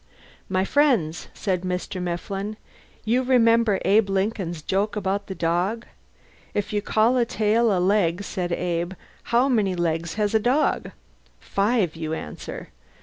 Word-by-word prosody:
"My 190 0 +1
friends," 235 - +2
said 185 -3 -1
Mr. 180 +1 -3
Mifflin. 195 +4 -4 0.5
"You 240 +4 +2
remember 230 -5 +3
Abe 205 0 +4
Lincoln's 190 -4 -1
joke 200 +6 0
about 200 0 -2
the 190 - -5
dog? 180 +8 0 0.7
If 205 0 -2
you 205 - +1
call 220 +4 +2
a 240 - +3
tail 225 +1 +2
a 190 - +2
leg, 185 -1 +2
said 180 -3 -3
Abe, 175 0 -1 0.3
how 240 +3 +3
many 210 -8 +1
legs 165 -1 -1
has 210 -1 0
a 220 - +4
dog? 255 +7 +1 0.5
Five, 200 -4 0
you 160 -1 -4
answer. 75 - -7
200 Hz, 145 wpm, -24 LUFS, 180-225 Hz, 0.7 s, Abe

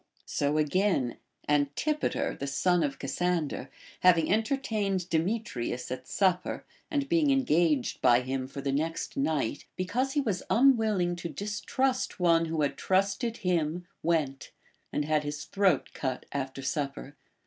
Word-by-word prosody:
So 145 +1 0
again, 155 -4 +1 0.3
Antipater, 150 - 0
the 140 - -5
son 175 +5 +2
of 145 -3 -1
Cassander, 155 -2 -1 0.3
having 175 -1 +5
entertained 215 -6 0
Demetrius 160 - -1
at 130 0 -5
supper, 185 -2 0 0.2
and 285 -2 -1
being 320 -2 +3
engaged 170 - +2
by 120 +1 +5
him 130 +1 -3
for 140 +1 -7
the 135 - -1
next 160 +4 -2
night, 140 -2 -1
because 250 +9 -1
he 295 - +2
was 205 -9 -1
unwilling 220 -8 +3
to 170 0 -5
distrust 230 +8 -1
one 165 -2 +4
who 160 -2 -1
had 145 - -1
trusted 200 +5 +1
him, 175 -1 0 0.2
went, 155 -5 0 0.4
and 150 - -1
had 155 0 +1
his 150 0 -4
throat 195 -8 +2
cut 130 -2 -3
after 135 -1 -4
supper. 140 0 -3
170 Hz, 135 wpm, -29 LUFS, 140-205 Hz, 0.4 s, having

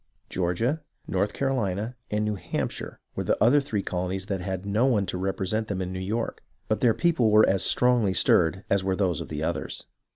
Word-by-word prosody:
Georgia, 105 - 0 0.3
North 100 +2 0
Carolina, 120 -4 -1
and 105 0 0
New 105 - 0
Hamp 100 - -3
shire - - -7 0.2
were - - -2
the - - +1
other 130 +6 +5
three 110 -8 -2
colonies 90 +1 -3
that 100 -3 -3
had 95 +1 -4
no 105 +6 +2
one 105 -7 +2
to - - -4
represent 95 +3 -1
them 100 -3 -3
in 95 0 -3
New 95 - -4
York, 110 +5 -3 0.3
but 110 - 0
their 120 -3 +4
people 165 -10 +2
were 105 +1 +6
as 95 -1 +2
strongly 125 -5 +3
stirred 90 +3 +3
as 100 -1 +2
were 95 0 0
those 90 -5 0
of - - -7
the - - -3
others. - - -3
100 Hz, 205 wpm, -26 LUFS, 95-115 Hz, 0.3 s, were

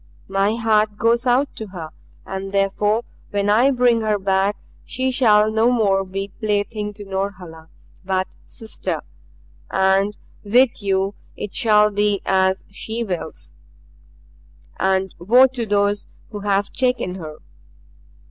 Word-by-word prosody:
My 195 +3 +1
heart 215 -2 +1
goes 235 +3 +2
out 260 +3 +2
to 220 - -5
her. 170 -5 -8 0.3
And 195 0 -5
therefore 205 +3 +1 0.3
when 205 0 0
I 240 +6 +5
bring 245 -3 +3
her 215 -1 +1
back 195 +1 +1 0.3
she 260 +1 -2
shall 215 -4 +4
no 220 +2 +3
more 200 -6 +2
be 195 +1 -5
plaything 210 0 -1
to 205 -1 -10
Norhala, 185 -5 -5 0.3
but 190 0 -1 0.2
sister. 220 -1 -5 0.7
And 195 +2 +2 0.3
with 235 +3 +3
you 195 0 0 0.2
it 205 - -6
shall 210 -2 +4
be 205 0 +1
as 190 0 +1
she 225 +3 -4
wills. 160 - -5 1.3
And 190 0 +1
woe 240 +9 +6
to 250 -3 -3
those 205 0 +1 0.2
who 210 - -5
have 200 0 0
taken 250 -8 0
her!" 155 -1 -8
205 Hz, 130 wpm, -21 LUFS, 195-225 Hz, 1.3 s, woe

